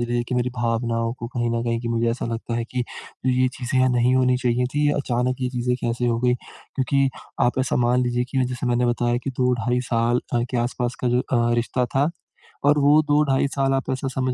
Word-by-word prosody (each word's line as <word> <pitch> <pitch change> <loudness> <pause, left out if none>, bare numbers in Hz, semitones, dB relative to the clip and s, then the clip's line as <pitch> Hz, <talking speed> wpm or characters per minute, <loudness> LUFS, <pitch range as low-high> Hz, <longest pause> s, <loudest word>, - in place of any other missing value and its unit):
लीजिए 120 0 0
कि - - -1
मेरी 125 0 0
भावनाओं 115 -1 0
को 115 - -5
कहीं 120 -1 -1
न 115 0 -1
कहीं 115 -1 -1
कि 120 - -4
मुझे 115 0 +1
ऐसा 120 +1 -3
लगता 115 0 -4
है 120 - -1
कि 125 -1 -1 0.4
ये 130 0 +3
चीज़ें 130 0 0
नहीं 125 0 +3
होनी 125 -1 +3
चाहिए 125 -1 +1
थीं, 145 0 +2
अचानक 125 -2 0
ये 125 - 0
चीज़ें 125 0 0
कैसे 120 +1 -1
हो 115 -1 +1
गई, 125 0 +3
क्योंकि 135 +2 -2 0.4
आप 120 +2 +1
ऐसा 130 -1 +1
मान 125 +1 +2
लीजिए 120 0 0
कि 130 -2 +1
जैसे 125 0 -3
मैंने 125 0 +2
बताया 120 0 +1
कि 135 - -1
2 125 -1 +2
ढाई 120 +1 0
साल 120 +1 +2
अ, 120 - +2
के 125 - -1
आसपास 120 +1 -1
का - - +3
जो 125 +1 +2
अ, 120 -2 +1
रिश्ता 120 +2 0
था 140 +3 +3 0.6
और 145 +1 +5
वो 145 +2 +5
2 145 +1 +5
ढाई 135 +1 +2
साल 135 -1 +1
आप 135 +1 -1
ऐसा 130 +1 -2
समझ 130 -1 0
125 Hz, 230 wpm, -23 LUFS, 120-130 Hz, 0.6 s, और